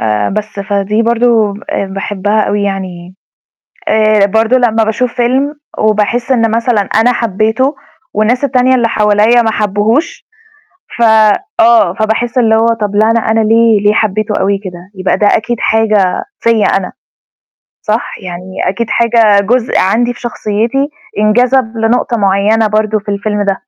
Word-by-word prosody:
آآ 105 -1 0
بس، 210 -1 -5
فدي 205 +2 -1
برضه 230 -3 +1 0.2
آآ 200 - -2
باحبها 200 +2 -2
أوي 205 -1 -1
يعني، 185 -2 -5 0.7
آآ 215 -1 +3
برضه 220 +5 +1
لمّا 225 -3 +1
باشوف 225 +3 -2
فيلم 260 +4 0 0.2
وباحس 215 +4 0
إن 230 -3 +1
مثلًا 230 -1 +1
أنا 225 +4 +1
حبّيته 225 +6 -1 0.4
والناس 225 +5 0
التانية 260 -1 +2
اللي 240 -2 +1
حواليّا 215 +2 +2
ما 225 -1 0
حبّوهوش، 215 - -1 0.7
ف - - -1 0.6
آه، 235 0 +4
فباحس 225 +3 -1
اللي 225 -2 +3
هو 225 +1 +2
طَب 210 -3 -2
لأ، 215 +1 +3
أنا 230 - +2
أنا 220 0 0
ليه 225 0 +3
ليه 210 0 +3
حبّيته 215 0 -1
أوي 195 +1 0
كده؟ 180 0 -10
يبقى 190 0 -1
ده 210 - +2
أكيد 235 +3 +1
حاجة 215 -4 +1 0.2
فيّا 230 -2 +2
أنا، 195 -1 -1 0.9
صح؟ 220 +1 -2
يعني 180 +1 -7
أكيد 230 +4 -3
حاجة 230 -3 +3
جزء 245 +1 0
عندي 235 +6 +1
في - - -16
شخصيتي 235 +4 -2 0.3
انجذب 235 +2 +1
لنقطة 235 +2 0
معيّنة 205 +2 +1
برضه 215 0 0
في 205 - -10
الفيلم 205 0 -2
ده. 195 +1 -2
220 Hz, 150 wpm, -12 LUFS, 205-235 Hz, 0.9 s, آه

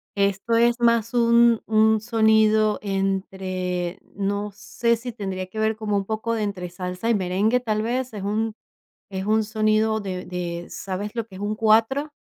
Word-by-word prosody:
Esto 200 +3 0
es 235 +1 +3
más 230 0 +2
un 235 -1 +4
un 220 0 +4
sonido 220 -1 +3
entre 190 -2 -2 0.2
no 200 +1 -2
sé 235 +3 0
si 245 +1 -6
tendría 190 -4 -5
que 215 +3 -7
ver 220 0 +1
como 210 -2 -1
un 195 - -2
poco 220 +2 -2
de 220 -2 -1
entre 185 -4 -4
salsa 180 +4 -4
y 230 - +4
merengue, 200 +6 +1
tal 215 -3 -1
vez, 245 +1 -2
es 200 -2 -6
un 215 +2 -1 0.6
es 190 -1 -4
un 215 +1 +2
sonido 215 0 +1
de 185 -2 -5
de 175 -1 -4
¿Sabes 195 +3 -5
lo 230 -2 -3
que 190 -4 -13
es - - -9
un 210 +1 -1
Cuatro? 225 +7 +2
215 Hz, 175 wpm, -23 LUFS, 195-225 Hz, 0.6 s, un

